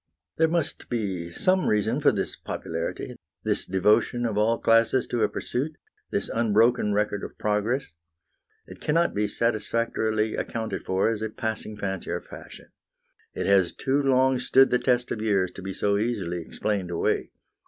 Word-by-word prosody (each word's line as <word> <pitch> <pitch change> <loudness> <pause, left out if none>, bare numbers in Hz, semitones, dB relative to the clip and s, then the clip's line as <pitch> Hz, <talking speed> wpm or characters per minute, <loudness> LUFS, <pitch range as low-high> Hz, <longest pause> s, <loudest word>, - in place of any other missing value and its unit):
There 160 - +4
must 165 -1 -2
be 95 -8 -2
some 185 - +2
reason 105 -1 +1
for - - +5
this - - -2
popularity, - - -5 0.3
this - - -1
devotion 105 +5 +2
of 110 -3 -1
all 110 +2 +2
classes 115 +3 +3
to 120 - -1
a 105 - +3
pursuit, 145 +5 -3 0.3
this - - -1
unbroken 115 0 +2
record 105 -1 0
of - - -8
progress. 105 +2 -1 0.7
It - - -13
cannot 170 +3 +2
be 105 0 0
satisfactorily 110 -1 0
accounted 110 -1 -4
for 95 +3 +1
as 110 -2 -2
a 110 - -2
passing 110 -2 -4
fancy 95 -3 -4
or - - -1
fashion. - - -12 0.7
It - - -2
has 95 -3 +3
too 135 +2 +1
long 130 -1 +3
stood 130 +2 +4
the 125 - +3
test 125 -1 +1
of 105 - -2
years 100 -4 +1
to - - -10
be 95 +1 -5
so 100 +1 0
easily 100 -7 -2
explained 95 +2 -3
away. 85 - 0
110 Hz, 165 wpm, -26 LUFS, 100-125 Hz, 0.7 s, for